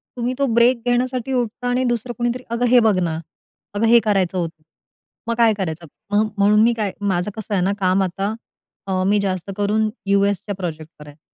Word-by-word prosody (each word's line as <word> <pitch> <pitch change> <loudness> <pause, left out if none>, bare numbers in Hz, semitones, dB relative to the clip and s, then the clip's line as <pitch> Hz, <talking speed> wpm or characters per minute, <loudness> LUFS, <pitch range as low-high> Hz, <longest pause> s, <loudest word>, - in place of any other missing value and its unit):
तुम्ही 245 +1 -2
तो 280 - +3
ब्रेक 235 0 +4
घेण्यासाठी 250 +1 0
उठता 245 0 -2
आणि 250 +1 +1
दुसरं 240 0 -2
कोणीतरी, 240 +1 -2
"अगं 235 +1 0
हे 250 - +8
बघ 205 - +3
ना. 165 -3 -1 0.5
अगं 205 +2 0
हे 235 +1 +7
करायचं 195 -4 +1
होतं. 165 -2 -4 0.7
मग 235 - 0
काय 230 -2 +5
करायचं?" 170 -3 -4 0.3
मग 215 +1 +3
म्हणून 210 +2 +4
मी 235 +1 +4
काय 210 -3 -1 0.2
माझं 180 +3 -1
कसं 215 -1 -5
आहे 185 - +1
ना 195 +2 +1
काम 190 0 +2
आता 195 +3 -2 0.5
अ, - - -3 0.2
मी 205 +1 +3
जास्त 190 -1 -2
करून 215 +1 +1 0.2
यूएसच्या 200 0 +1
प्रोजेक्ट 160 -4 -6
करायचे. 150 0 -13
205 Hz, 190 wpm, -20 LUFS, 185-235 Hz, 0.7 s, हे